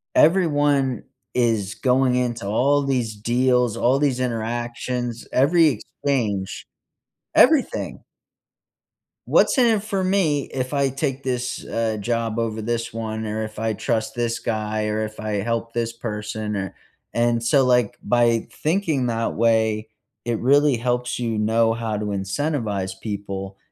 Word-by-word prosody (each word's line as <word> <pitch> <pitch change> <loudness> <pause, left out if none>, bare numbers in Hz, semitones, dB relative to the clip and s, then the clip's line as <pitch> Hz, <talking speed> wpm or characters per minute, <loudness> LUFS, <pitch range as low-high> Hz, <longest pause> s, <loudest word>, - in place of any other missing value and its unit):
everyone 145 -6 +3 0.3
is 110 -5 +1
going 125 +1 +2
into 120 -4 -1
all 140 +6 +2
these 120 -5 -1
deals, 125 +1 +2
all 130 +3 +3
these 135 -4 +1
interactions, 120 0 -3
every 160 +5 +5 0.4
exchange, 105 -9 -1 0.7
everything. 295 -1 +3 1.2
What's - - +4
in 250 - +5
it 200 - -5
for 200 -3 -1
me 170 -7 +2
if 130 0 -2
I 140 -1 +2
take 135 0 -3
this, 125 -1 -3
uh, 115 -1 -1
job 115 0 -1
over 110 -1 -2
this 115 +1 -2
one, 110 -1 -4
or 110 +1 -2
if 110 0 -7
I 110 0 -1
trust 110 +1 -1
this 120 -1 -1
guy, 110 -1 -2
or 105 +1 -1
if 110 0 -7
I 105 -2 -2
help 115 +1 -2
this 115 -1 -1
person, 110 -2 -4
or 95 -2 -4 0.4
and 120 0 +1
so, 130 +3 +4
like, 125 -2 +2
by 120 -1 +2
thinking 155 -6 0
that 115 -1 -1
way, 110 -1 +2 0.4
it 120 -2 0
really 140 0 +4
helps 125 +1 -1
you 115 -3 -1
know 115 +1 +2
how 115 -2 -3
to 105 0 -3
incentivize 100 -1 -2
people 100 -2 -5
120 Hz, 140 wpm, -22 LUFS, 110-130 Hz, 1.2 s, every